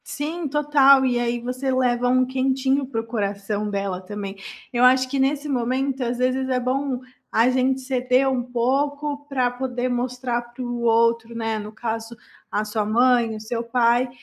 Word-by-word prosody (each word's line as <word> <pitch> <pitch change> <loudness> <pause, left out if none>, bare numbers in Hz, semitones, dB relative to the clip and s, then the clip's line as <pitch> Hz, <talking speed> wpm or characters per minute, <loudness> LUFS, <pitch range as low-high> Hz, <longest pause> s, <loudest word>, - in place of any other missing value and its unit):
Sim, 310 +3 -4
total, 280 -2 +5
e 245 -2 +1
aí 240 0 -1
você 255 +3 -3
leva 250 -1 +1
um 255 0 +3
quentinho 265 +1 0
para 230 -4 -2
o - - -12
coração 205 -2 -2
dela 195 -2 -3
também. 200 +1 -6 0.4
Eu 240 0 +2
acho 255 +1 +5
que 275 +1 -2
nesse 280 +2 +1
momento, 260 +1 -1
às 240 0 -2
vezes 255 +1 0
é 255 -1 +1
bom 260 +1 -1 0.3
a 230 +3 +4
gente 260 +1 +1
ceder 255 0 +1
um 260 -2 0
pouco 285 +4 -1
pra 255 -3 +1
poder 250 0 -3
mostrar 245 0 -2
para 240 +1 -12
o 240 -1 -4
outro, 230 0 +2
né, 225 -1 -2
no 210 0 -7
caso 225 +1 -5 0.3
a 210 - -1
sua 215 0 -1
mãe, 235 +1 +3
o - - -6
seu 230 +2 -4
pai, 240 +1 +2
250 Hz, 175 wpm, -23 LUFS, 230-265 Hz, 0.4 s, total